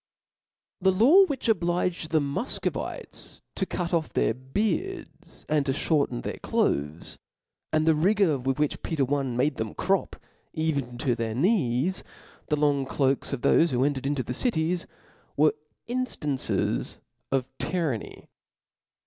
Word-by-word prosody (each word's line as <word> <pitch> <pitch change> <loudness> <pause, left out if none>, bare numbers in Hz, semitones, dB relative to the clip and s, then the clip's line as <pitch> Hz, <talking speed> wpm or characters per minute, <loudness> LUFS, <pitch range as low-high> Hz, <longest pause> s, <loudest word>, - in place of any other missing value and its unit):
The 190 +1 +5
law 275 - +7
which 280 -8 -3
obliged 175 -4 0
the 160 - +3
Mufcovites 145 - -3
to 190 - -2
cutoff 170 -2 -1
their - - +2
beards, 210 - -3
and 150 -1 +2
to 135 - +2
ihorten 140 - 0
their - - -4
cloaths, 75 +3 -1 0.5
and 155 0 +2
the 160 - +5
rigour 175 -2 +3
with 130 +1 -1
which 150 -1 0
Peter 150 -5 0
L 140 +1 +1
made 130 +3 0
them 110 -2 -4
crop, 190 +1 0 0.4
even 140 -7 -1
to 125 0 +1
their 115 -1 -2
knees, 165 - +1 0.4
the 150 - +2
long 145 -2 +1
cloaks 135 -1 0
of 140 -4 -3
thofe 170 - +4
who 125 -2 +1
entered 140 -2 -1
into 140 -2 0
the 125 - -4
cities, 170 - 0 0.5
were 150 +1 +5 0.3
inflrances 230 - -1 0.3
of 135 -2 +1
tyranny. 160 - -2
150 Hz, 135 wpm, -27 LUFS, 130-180 Hz, 0.5 s, law